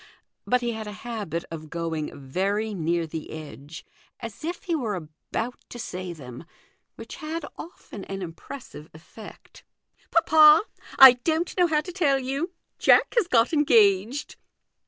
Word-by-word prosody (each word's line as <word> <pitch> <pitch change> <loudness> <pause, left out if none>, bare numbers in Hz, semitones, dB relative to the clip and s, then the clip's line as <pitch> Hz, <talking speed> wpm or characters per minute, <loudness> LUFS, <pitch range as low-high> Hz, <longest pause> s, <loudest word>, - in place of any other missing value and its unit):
But 250 0 +2
he 240 -1 -1
had 220 -1 -6
a 210 - -6
habit 205 -8 -4
of 155 -1 -8
going 165 -3 -4
very 200 +10 -2
near 170 -2 -1
the 160 0 -7
edge, 155 0 -10 0.3
as 230 +4 -9
if 340 +2 -4
he 355 - -2
were 235 -10 -1
about 180 +8 -6
to - - -9
say 185 -6 -6
them, 125 -6 -10 0.5
which - - -10
had 315 0 -5
often 220 - -10
an 195 -1 -5
impressive 165 - -10
effect. 205 +7 -14 0.3
" - - -35
Papa 315 0 +6 0.3
I 265 -2 +11
don't 325 +1 0
know 360 -1 +4
how 305 -2 +1
to 360 - -8
tell 300 -7 +2
you 270 +6 -3 0.3
Jack - - +4
has 460 -7 +3
got 235 +1 +3
engaged." 230 -2 +3
220 Hz, 155 wpm, -25 LUFS, -, 0.5 s, I